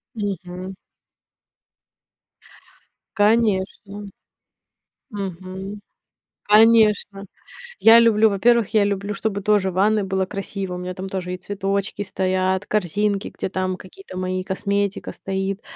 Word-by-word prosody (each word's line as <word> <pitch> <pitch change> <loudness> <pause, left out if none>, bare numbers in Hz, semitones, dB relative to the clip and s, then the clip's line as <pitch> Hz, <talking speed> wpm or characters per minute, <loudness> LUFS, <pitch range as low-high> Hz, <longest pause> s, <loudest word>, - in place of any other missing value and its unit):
Мгм. 185 -2 -5 2.4
Конечно. 205 -1 +1 1.0
Мгм, 190 0 -6 0.6
конечно. 210 -2 +4 0.5
Я 225 +1 +8
люблю, 220 -1 +5
во-первых, 230 +2 +3
я 210 -2 +4
люблю, 200 +1 -2
чтобы 200 -1 -2
тоже 205 -2 +2
в - - -11
ванной 210 +2 +2
было 190 0 -1
красиво. 195 -1 -5
У - - -5
меня 180 0 -5
там 190 +1 -6
тоже 180 -1 -4
и - - -4
цветочки 200 +1 -3
стоят, 185 0 0
корзинки, 205 +1 0
где - - -3
там 185 0 -2
какие-то 185 - -12
мои, 185 0 -2
косметика 200 +1 -2
стоит, 195 +1 -4
195 Hz, 110 wpm, -22 LUFS, 185-210 Hz, 2.4 s, Я